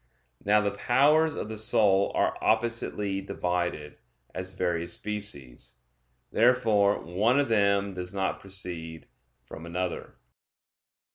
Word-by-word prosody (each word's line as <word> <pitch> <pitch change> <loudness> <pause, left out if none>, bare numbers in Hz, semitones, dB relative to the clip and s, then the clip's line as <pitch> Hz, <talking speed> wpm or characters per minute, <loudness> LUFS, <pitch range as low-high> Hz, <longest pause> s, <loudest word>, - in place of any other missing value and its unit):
Now 105 +1 +4
the 100 -1 0
powers 145 +9 +3
of - - -4
the 110 -1 -5
soul 105 -4 +3
are - - +1
oppositely 110 -3 0
divided, 90 -5 -3 0.3
as 90 0 -5
various 85 -2 -2
species. 70 -14 -3 0.6
Therefore 110 -4 +3
one 105 - +1
of 140 -3 0
them 100 -2 +2
does 90 -1 -5
not 95 -1 -2
proceed 85 -4 -6 0.4
from 80 - -11
another. 90 +1 -4
100 Hz, 115 wpm, -27 LUFS, 90-110 Hz, 0.6 s, Now